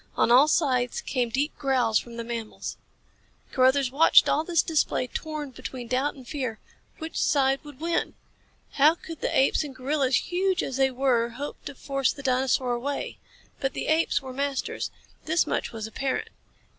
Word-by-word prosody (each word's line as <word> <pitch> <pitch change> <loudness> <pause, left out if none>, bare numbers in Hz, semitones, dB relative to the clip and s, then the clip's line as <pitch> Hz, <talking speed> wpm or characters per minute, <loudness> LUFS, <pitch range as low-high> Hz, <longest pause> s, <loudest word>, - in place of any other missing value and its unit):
On - - +3
all 260 +5 +7
sides 255 -7 +1
came 250 -3 -1
deep 280 +6 -1
growls 250 -5 +2
from 235 -1 -10
the 235 - -3
mammals. 230 -2 -5 0.8
Carruthers 260 0 +3
watched 305 +5 +6
all 310 - +2
this 335 -1 +2
display 305 -5 +1
torn 300 +1 -5
between 255 -1 -7
doubt 260 +4 0
and 260 -3 -13
fear. 255 -6 -3 0.4
Which 320 +1 -6
side 270 -2 +2
would 290 -3 -12
win? 335 +1 -1 0.6
How 300 +4 +5
could 330 -2 -10
the - - 0
apes 270 +3 +3
and 280 -3 -8
gorillas, 265 0 +1
huge 370 - 0
as 265 - -3
they 270 0 +4
were, 250 -3 +1
hope 280 +5 -7
to 285 - -6
force 275 0 0
the 280 - -10
dinosaur 255 -1 +1
away? 270 +4 -3 0.4
But 270 -1 -1
the - - -4
apes 315 -2 +2
were 260 -1 -7
masters. 275 0 -2 0.4
This 320 +2 +2
much - - -2
was 220 -2 -5
apparent. 260 +4 -3
270 Hz, 170 wpm, -26 LUFS, 250-295 Hz, 0.8 s, all